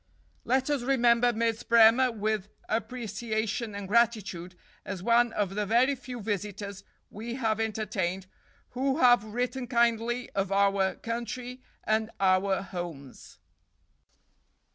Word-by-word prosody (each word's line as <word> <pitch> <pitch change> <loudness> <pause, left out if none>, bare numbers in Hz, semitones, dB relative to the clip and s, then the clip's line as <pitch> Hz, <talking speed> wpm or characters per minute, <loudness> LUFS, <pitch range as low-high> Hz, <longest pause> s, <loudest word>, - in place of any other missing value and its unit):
(Let 260 +3 +1
us 285 -3 0
remember 240 -2 +3
Miss 230 0 -1
Bremer 235 +2 +5
with 215 -2 -2 0.2
appreciation 220 -1 -3
and 200 -1 -6
gratitude, 205 -6 0 0.3
as 190 -3 -6
one 235 +1 +3
of 195 -2 -1
the 210 0 -2
very 245 +6 +3
few 250 -2 -8
visitors 200 -1 -4 0.3
we 230 +3 -6
have 225 -4 0
entertained 195 -4 -2 0.4
who 265 +2 -1
have 245 -7 +5
written 245 +3 -3
kindly 235 0 +1
of 195 -1 -2
our 195 -1 +2
country 245 +2 -5 0.2
and 220 0 0
our 190 0 +2
"Homes.") 170 -9 -8
220 Hz, 120 wpm, -28 LUFS, 200-240 Hz, 0.4 s, Bremer